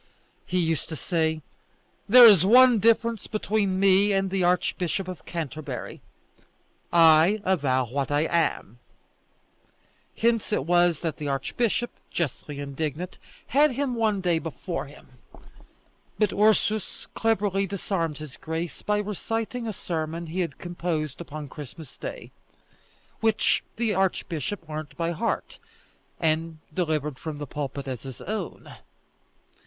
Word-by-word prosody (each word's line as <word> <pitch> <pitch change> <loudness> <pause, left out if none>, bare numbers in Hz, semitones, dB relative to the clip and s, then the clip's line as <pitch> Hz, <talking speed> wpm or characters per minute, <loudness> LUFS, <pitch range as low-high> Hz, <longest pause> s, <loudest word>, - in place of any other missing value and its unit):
He 185 - -1
used 165 -3 0
to 160 - -4
say: 160 -1 -1 0.7
"There 245 +2 +10
is 200 -7 +8
one 245 +3 +7
difference 230 +1 +2
between 205 -3 0
me 195 +1 +5
and 195 -1 0
the 190 -1 +1
Archbishop 180 +1 0
of 185 -1 -8
Canterbury: 155 -3 -5 0.9
I 165 +4 +6
avow 140 -9 +1
what 135 +4 -2
I 145 0 +2
am." 160 - 0 1.4
Hence 230 -2 +1
it 140 - 0
was 175 -1 +3
that 165 -3 -2
the 150 - -4
archbishop, 220 - -1 0.2
justly 150 -2 -3
indignant, 150 +5 -4 0.3
had 290 0 +4
him 270 0 -1
one 220 -4 +1
day 175 -3 +2
before 170 +2 -5
him; 130 -3 -17 1.0
but 210 -2 +2
Ursus 215 -1 +1
cleverly 200 -3 +1
disarmed 175 -5 -2
his 155 -3 -9
grace 160 0 -4
by 210 0 0
reciting 225 +3 -3
a - - -1
sermon 165 -3 -4
he 165 +3 -5
had 175 -2 -2
composed 170 -4 -3
upon 155 -3 -7
Christmas 150 +1 -10
Day, - - -7 0.9
which 220 -1 +2
the 230 0 0
delighted 195 -3 0
archbishop 175 -2 -2
learnt 155 -1 -6
by 170 0 0
heart, 165 - -3 0.6
and 160 0 0 0.2
delivered 150 -5 -1
from 155 -2 -5
the 145 - -5
pulpit 140 0 -5
as 130 -3 -4
his 135 -2 -9
own. 215 +1 -6
175 Hz, 130 wpm, -26 LUFS, 155-205 Hz, 1.4 s, There